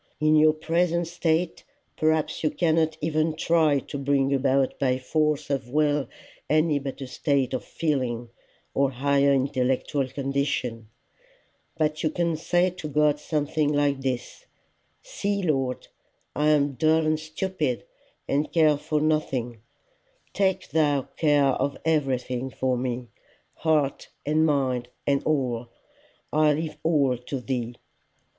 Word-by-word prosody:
In 155 0 +4
your 155 0 +6
present 170 +2 0
state 165 0 -1 0.3
perhaps 155 0 0
you 155 - +3
cannot 160 -2 +1
even 155 0 0
try 160 -2 +3
to 140 - -6
bring 140 0 +1
about 135 0 +1
by 130 -2 +2
force 150 +2 0
of 135 -3 -2
will 145 -1 +1 0.4
any 155 -1 +3
better 135 -1 -6
state 135 0 0
of 125 -5 -2
feeling 125 -7 -2 0.4
or 140 0 +2
higher 140 +2 +2
intellectual 135 0 0
condition; 135 -4 -2 0.9
but 155 -1 0
you 155 - +1
can 170 0 0
say 175 +3 +1
to 175 -3 -7
God 150 0 +2
something 150 -1 0
like 145 -2 +1
this: 130 - -4 0.6
'See, 205 - -2
Lord, 135 -6 -1 0.5
I 150 +1 +2
am 145 -1 +3
dull 155 +5 +2
and 155 0 +1
stupid, 155 -4 -3 0.4
and 145 +2 0
care 155 -3 +4
for 150 0 -1
nothing: 130 -7 -1 0.7
take 190 -2 0
thou 145 -3 +2
care 145 -3 +3 0.2
of 140 +1 -1
everything 130 -5 0
for 130 0 -1
me, 125 -1 -3 0.5
heart 150 -4 0 0.2
and 155 +2 +3
mind 130 -4 0 0.2
and 140 -1 +1
all. 125 -6 0 0.7
I 155 0 +4
leave 155 +1 -4
all 140 -7 +2
to 130 +2 -5
thee. 120 -2 -3
145 Hz, 130 wpm, -25 LUFS, 135-155 Hz, 0.9 s, your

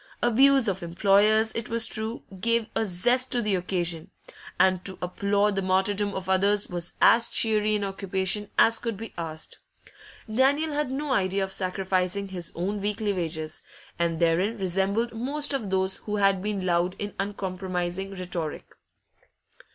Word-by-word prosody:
Abuse 265 +2 +5
of 190 -1 -1
employers, 205 +5 +3
it 230 - -3
was 230 -1 +4
true, 220 +1 -1 0.2
gave 230 +2 +2
a 220 - +1
zest 245 +8 +1
to 245 - +2
the 210 -3 0
occasion, 175 -3 -1 0.5
and 185 -1 +3
to 190 -1 -4
applaud 200 +3 0
the 195 - 0
martyrdom 195 +2 0
of 190 -1 -5
others 200 +2 +2
was 175 -1 -4
as 230 0 +5
cheery 215 -1 +2
an 205 - -1
occupation 195 +1 -2
as 225 0 +4
could 230 -4 -4
be 225 +1 -8
asked; 160 -2 -4 0.7
Daniel 275 +7 +2
had 295 -2 -1
no 280 +2 -3
idea 195 -1 +1
of 190 - -4
sacrificing 190 +1 -1
his 180 -2 -5
own 195 +4 -2
weekly 210 0 -1
wages, 160 -3 -4 0.4
and 170 -1 0
therein 175 +7 +1
resembled 195 +5 0
most 285 +6 -1
of 230 -8 -2
those 190 0 0
who 210 - -5
had 195 -2 +2
been 200 -2 -2
loud 175 +1 +1
in 205 -1 -4
uncompromising 190 -2 -3
rhetoric. 175 -4 -4
195 Hz, 155 wpm, -26 LUFS, 185-220 Hz, 0.7 s, Abuse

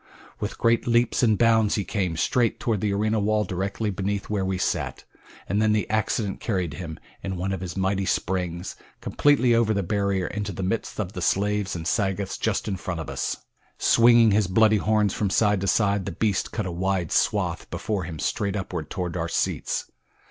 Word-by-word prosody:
With - - -4
great 115 0 +2
leaps 120 0 +2
and 110 -4 +3
bounds 115 -2 +3
he 100 - 0
came, 90 -6 -2
straight 120 +6 +1
toward 110 -5 -1
the 105 - 0
arena 110 +2 +1
wall 105 +1 +1
directly 100 +3 -2
beneath 100 +2 -3
where 100 -2 0
we 95 0 -1
sat, 95 - -2 0.4
and 100 +4 +1
then 110 0 +3 0.2
accident 110 -1 0
carried 90 -8 -2
him, 80 -4 -6 0.2
in 95 -1 -4
one 95 +2 -2
of 95 -2 -3
his 90 -2 -6
mighty 95 0 0
springs, 90 -1 -2 0.2
completely 140 -4 +3
over 115 -2 +3
the 100 - 0
barrier 100 -1 0
into 105 +2 -3
the 95 - -4
midst 110 +4 -2
of 100 -2 -3
the 90 - -5
slaves 100 +2 0
and 80 -1 -5
Sagoths 95 -2 -1
just 110 -1 -1
in 100 -2 -2
front 90 -2 -4
of 80 - -5
us. - - -2 0.4
Swinging 115 -1 +5
his 100 -1 +3
bloody 110 +3 +4
horns 105 0 +2
from 105 - -1
side 105 0 +2
to 95 - -1
side 100 -1 +2
the - - -2
beast 100 +2 -1
cut 110 -2 -3
a 90 - -3
wide 90 -1 -1
swath - - 0
before 100 -5 -3
him 85 -2 -6
straight 100 +6 -1
upward 90 -6 -4
toward 90 -3 -3
our 85 -1 -2
seats. - - -2
100 Hz, 195 wpm, -25 LUFS, 95-110 Hz, 0.4 s, Swinging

